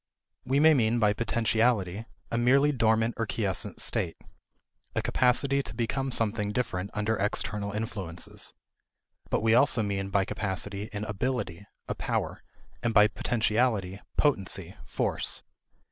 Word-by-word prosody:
We 135 +2 +2
may 160 +1 +7
mean 120 -4 +2
by 105 -3 +3
potentiality 110 -3 +1 0.3
a 115 - 0
merely 135 +5 +4
dormant 115 -2 +2
or 115 - -1
quiescent 100 -5 -2
state 85 -3 0 0.8
a - - +1
capacity 135 +2 +2
to - - -9
become 135 +3 -1
something 105 -3 0
different 100 -5 -2
under 105 +1 0
external 105 0 -1
influences. 100 -5 -4 0.7
But - - 0
we 110 0 +4
also 125 -2 +5
mean 100 -1 -2
by 100 -1 +2
capacity 100 0 -3
an 105 -1 -4
ability, 105 -4 -3 0.2
a - - -1
power; - - -2 0.4
and 120 -2 -1
by 105 0 +7
potentiality 110 -3 0 0.2
potency, 95 - 0
force. - - 0
110 Hz, 130 wpm, -28 LUFS, 100-120 Hz, 0.8 s, may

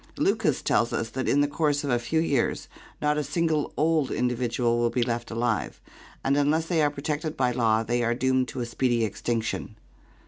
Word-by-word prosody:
Lucas - - +1
tells 120 +1 +2
us 115 -1 -2
that 130 -1 -2
in 145 - +3
the 145 - +3
course 145 -1 0
of 140 - -1
a 120 - +2
few 160 +7 0
years 145 -6 0 0.4
not 150 0 +2
a - - -1
single 155 +1 0
old 155 -2 +2
individual 120 -1 0
will 120 0 +2
be 120 +1 0
left 120 -1 -3
alive, 115 -2 -1 0.4
and 135 - +2
unless 150 +3 +2
they 165 -1 +1
are 150 - +4
protected 150 +2 -3
by 125 -2 +2
law 115 -2 +2
they 120 +2 0
are 120 0 +1
doomed 130 0 +1
to 125 +1 -5
a - - -1
speedy 120 -1 +1
extinction. 110 0 -3
130 Hz, 200 wpm, -26 LUFS, 120-145 Hz, 0.4 s, are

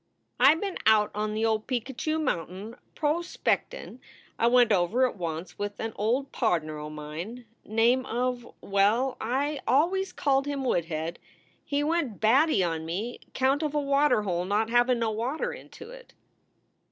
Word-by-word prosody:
"I 270 +5 +7
been 385 +3 -4
out 215 -1 +5
on 210 0 -2
the 220 +1 0
old 220 -1 0
Picacho 260 +5 -2
mountain 200 - -3 0.2
pros 320 +3 0
speck - - 0
tin. - - -10 0.4
I 230 - +4
went 245 -1 +5
over 205 +7 +3
it 255 - -2
once 165 -2 -5
with 205 0 -4
an 225 -1 -3
old 250 +6 0
pardner 160 - -1
o 150 0 -6
mine 155 +11 -7 0.2
name 235 +4 +2
of 245 0 -2
well, 210 +7 +2
I 275 +5 -1
always 365 +7 +2
called 275 0 +1
him 280 -2 -2
Woodhead. 165 -7 -2 0.4
He 285 0 -1
went 300 -8 -1
batty 240 - +4
on 165 -2 -2
me 200 +9 -4 0.2
count 270 +3 +2
of 300 -1 -2
a - - +3
water 280 -4 +2
hole 175 -3 -1
not 210 +4 0
havin 245 +1 +4
no 230 -1 0
water 240 +8 -2
into 460 +1 -11
it." - - -13
235 Hz, 165 wpm, -27 LUFS, 205-275 Hz, 0.4 s, I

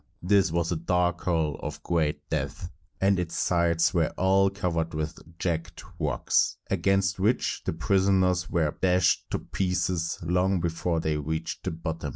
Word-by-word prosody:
This 95 -2 +3
was 85 0 0
a 85 - 0
dark 90 +1 0
hole 80 -5 0
of - - -6
great 75 -3 -1
depth, 75 +3 -3 0.3
and 95 -1 +3
its 85 -1 -3
sides 85 0 +2
were 85 -3 +2
all 95 +1 +4
covered 85 -4 -2
with 75 0 -3 0.2
jagged 85 -2 -3 0.2
rocks, - - +1
against 95 0 +1
which 110 +6 +1
the - - -1
prisoners 95 +1 +2
were 80 -4 0
dashed 90 -1 +2
to - - -1
pieces 90 -3 -1
long 90 +2 +1
before 85 0 -1
they 80 -1 0
reached 80 +2 -4
the - - 0
bottom. 80 -2 -4
85 Hz, 155 wpm, -27 LUFS, 80-95 Hz, 0.3 s, all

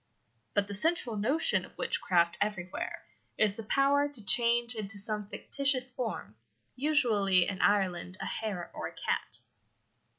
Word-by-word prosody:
But 205 0 +2
the 205 - -6
central 250 - +1
notion 260 +11 +2
of - - -15
witchcraft 170 -1 +1
everywhere 190 -4 -3 0.3
is 210 -2 +2
the 225 - -7
power 280 +5 +2
to 245 -8 -7
change 235 +3 +5
into 210 -2 -6
some 210 0 -2
fictitious 265 +2 0
form, 225 - -5 0.4
usually 225 - +2
in 190 -2 -3
Ireland 185 -3 +1
a - - -5
hare 200 -6 -4
or - - -5
a - - -11
cat. - - -3
215 Hz, 140 wpm, -30 LUFS, 195-255 Hz, 0.4 s, change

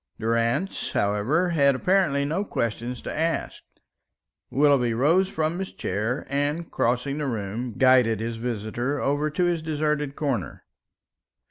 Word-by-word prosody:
Durrance, 115 - -1
however, 105 - +1
had 140 -5 +3
apparently 150 -2 +2
no 160 +7 -1
questions 120 - -3
to - - -5
ask. 165 +1 -1 0.9
Willoughby 135 -5 +3
rose 165 +10 +3
from 160 +3 -1
his 190 - -4
chair, 110 +8 -2
and 145 +4 -2
crossing 125 +5 0
the 150 - -1
room, 115 +1 -3
guided 125 -4 +4
his 115 +1 -3
visitor 120 +4 -2
over 145 +3 0
to 175 +4 0
his 175 -2 0
deserted 150 -2 -1
corner. 135 - -3
140 Hz, 130 wpm, -25 LUFS, 115-155 Hz, 0.9 s, guided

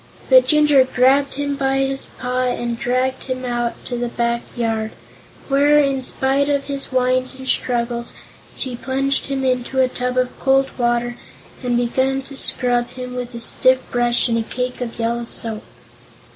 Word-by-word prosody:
But - - +7
Jinjur 295 -3 +5
grabbed 270 +3 +3
him 285 0 -2
by 270 -1 0
his 270 0 0
paw 250 0 -2
and 240 -1 -2
dragged 255 +1 -1
him 255 -1 -4
out 240 -1 -1
to 245 - -4
the 240 0 -2
back 235 0 -1 0.2
yard, 225 -2 -1 0.5
where, 285 +2 +4
in 275 -2 +2
spite 270 +2 +1
of 280 -1 +1
his 275 -1 -4
whines 255 0 +1
and 260 0 -7
struggles, 235 -1 -1 0.4
she 255 -2 -4
plunged 270 +2 -1
him 270 -1 -2
into 255 +1 0
a 260 - +5
tub 250 0 -3
of 255 0 -1
cold 270 0 +2
water 240 0 0 0.4
and 245 -2 0
began 260 +3 0
to 275 +1 -8
scrub 245 -2 +2
him 250 -1 -7
with 245 -1 -5
a - - -5
stiff 255 +2 +3
brush 240 0 +1
and 230 -1 +1
a - - +1
cake 250 +3 -4
of 240 -2 -5
yellow 235 +1 -1
soap. 225 -2 -4
255 Hz, 170 wpm, -20 LUFS, 240-270 Hz, 0.5 s, But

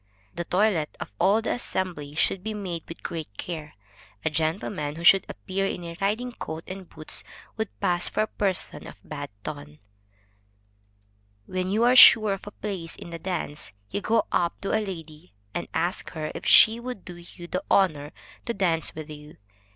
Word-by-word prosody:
The 170 0 -4
toilet 180 -5 +1
of - - -6
all 210 +4 +4
the - - 0
assembly 175 -10 -3
should 180 +4 +1
be 220 0 -3
made 180 -5 -4
with 165 - -9
great 155 -12 -5
care. 155 -4 -6 0.5
A 160 - +2
gentleman 155 -1 -1
who 165 - -7
should 195 +2 +7
appear 195 +1 -2
in 180 - -4
a 170 0 -6
riding 220 +5 0
coat 160 -8 -6
and 185 -1 -8
boots, 155 0 -4 0.3
would 220 -2 -2
pass 175 0 +1
for - - 0
a - - -2
person 190 -7 -2
of - - -9
bad 145 -2 -6
ton. 150 0 -7 1.7
When 185 +5 -2
you 215 +4 +2
are 245 +1 +5
sure 215 -5 +9
of 195 - -7
a - - -6
place 190 -6 -5
in 170 - -10
the 170 - -5
dance, 160 - -4 0.2
you 205 - -2
go 225 +2 +2
up 170 -1 +1
to 195 - -3
a 220 - +2
lady, 155 - -8 0.2
and - - -3
ask 175 +3 -1
her 155 -2 -3
if - - -6
she 225 +1 +8
will 250 +1 -4
do 180 -3 -11
you 175 0 -11
the 280 - -3
honor 150 -7 +3 0.4
to 235 - -1
dance 165 -4 +1
with 155 0 -7
you. 150 +1 -11
175 Hz, 185 wpm, -26 LUFS, 155-200 Hz, 1.7 s, sure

